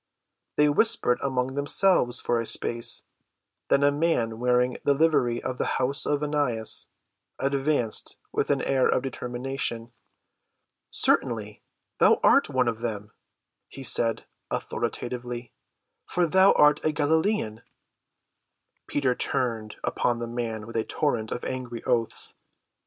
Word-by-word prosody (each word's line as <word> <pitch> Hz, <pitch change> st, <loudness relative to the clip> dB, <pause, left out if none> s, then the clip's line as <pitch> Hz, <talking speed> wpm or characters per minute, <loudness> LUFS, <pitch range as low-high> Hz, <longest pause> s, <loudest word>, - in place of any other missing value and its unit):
They 150 Hz, -, +4 dB
whispered 145 Hz, -, +2 dB
among 130 Hz, -1 st, -1 dB
themselves 145 Hz, -2 st, +3 dB
for 120 Hz, -, 0 dB
a 115 Hz, -, -3 dB
space, 115 Hz, 0 st, +2 dB, 0.7 s
then 140 Hz, -, +3 dB
a 145 Hz, -, +4 dB
man 140 Hz, -8 st, -1 dB
wearing 125 Hz, 0 st, +1 dB
the 140 Hz, -, +2 dB
livery 135 Hz, -6 st, +1 dB
of 130 Hz, -1 st, -4 dB
the -, -, 0 dB
house 130 Hz, +2 st, +1 dB
of 145 Hz, 0 st, 0 dB
Annas 145 Hz, -7 st, 0 dB, 0.5 s
advanced 135 Hz, -4 st, +1 dB
with -, -, -1 dB
an -, -, +1 dB
air 130 Hz, -1 st, +2 dB
of 130 Hz, -, +1 dB
determination. 125 Hz, -2 st, -4 dB, 1.0 s
"Certainly, 105 Hz, -3 st, +2 dB, 0.4 s
thou -, -, +5 dB
art -, -, +4 dB
one 130 Hz, -1 st, +1 dB
of 115 Hz, -1 st, -2 dB
them," 105 Hz, -3 st, -5 dB, 0.6 s
he 135 Hz, -, -10 dB
said 115 Hz, -2 st, +2 dB, 0.2 s
authoritatively, 120 Hz, -1 st, -4 dB, 0.5 s
"for 175 Hz, 0 st, +1 dB
thou 190 Hz, +4 st, +5 dB
art 150 Hz, 0 st, +4 dB
a 155 Hz, -, +1 dB
Galilean." 155 Hz, -, 0 dB, 1.3 s
Peter 135 Hz, -3 st, 0 dB
turned 115 Hz, -4 st, -2 dB
upon 120 Hz, -1 st, 0 dB
the 120 Hz, -, -4 dB
man 115 Hz, -2 st, -4 dB
with 115 Hz, 0 st, -6 dB
a 110 Hz, -, +1 dB
torrent 120 Hz, -8 st, -2 dB
of -, -, -4 dB
angry 125 Hz, -3 st, -5 dB
oaths. 120 Hz, -3 st, -1 dB
125 Hz, 130 wpm, -26 LUFS, 115-145 Hz, 1.3 s, thou